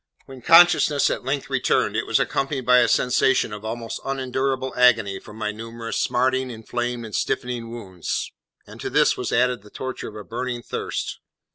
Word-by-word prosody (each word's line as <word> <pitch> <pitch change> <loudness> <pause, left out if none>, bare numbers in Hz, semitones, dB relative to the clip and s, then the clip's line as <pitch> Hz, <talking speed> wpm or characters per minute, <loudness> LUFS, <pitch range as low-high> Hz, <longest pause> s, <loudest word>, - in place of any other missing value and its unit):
When 135 -1 -12
consciousness 165 -2 +6
at - - -4
length 140 +2 -2
returned, 135 -3 +1
it - - -1
was - - +2
accompanied 135 -2 -1
by 125 0 +6
a 120 - +4
sensation 125 -1 +2
of 105 0 -8
almost 115 +1 -5
unendurable 130 0 -2
agony 110 -6 +3
from 105 - -13
my 105 -1 -2
numerous 115 +1 -6
smarting, 130 +1 +1
inflamed, 120 +1 -4
and 110 - -10
stiffening 120 -2 -2
wounds; 95 -7 -4 0.3
and - - -12
to - - -3
this - - +3
was - - -4
added 125 -1 +2
the 105 - -16
torture 130 +4 -6
of 105 - -13
a 105 - -7
burning 120 +2 -4
thirst. - - -4
125 Hz, 175 wpm, -23 LUFS, 115-130 Hz, 0.3 s, consciousness